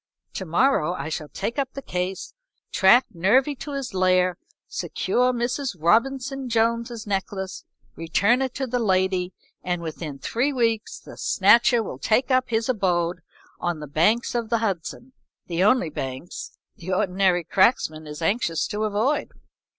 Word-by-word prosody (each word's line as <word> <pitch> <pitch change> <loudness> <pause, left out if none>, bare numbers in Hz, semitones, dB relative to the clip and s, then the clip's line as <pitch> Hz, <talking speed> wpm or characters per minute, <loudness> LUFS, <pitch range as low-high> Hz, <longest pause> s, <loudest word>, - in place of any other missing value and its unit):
"To 190 - -5
morrow 175 - +2
I 145 +1 -5
shall 155 -1 -5
take 240 +5 -3
up 265 -2 -2
the 275 - -6
case, 180 +1 -4 0.4
track 240 +7 +5
Nervy 230 - +3
to 290 - -7
his 275 -6 -4
lair, 185 -1 +2 0.3
secure 250 +1 0
Mrs. 245 0 -2
Robinson 260 - +1
Jones' 230 0 0
necklace, 190 -1 -4 0.3
return 200 +9 +2
it 260 -2 -2
to 270 - -2
the 250 0 -1
lady, 185 -3 +1 0.3
and 180 -1 -1
within 155 -3 -6
three 245 - -1
weeks 230 -4 0
the - - -13
Snatcher 230 +4 +4
will 130 - -7
take 245 - +1
up 255 0 +2
his 225 -1 0
abode 175 -7 0 0.4
on 175 -2 -2
the 150 - -6
banks 170 - +1
of 235 -2 -2
the 230 - +2
Hudson, 220 +4 -4 0.3
the 175 +1 0
only 210 -6 +3
banks 135 +4 -6 0.2
the 180 +2 -6
ordinary 185 -2 +2
cracksman 160 -5 +2
is 150 +2 -7
anxious 165 -4 0
to 210 +1 -1
avoid." 215 +8 0
205 Hz, 150 wpm, -24 LUFS, 175-245 Hz, 0.4 s, track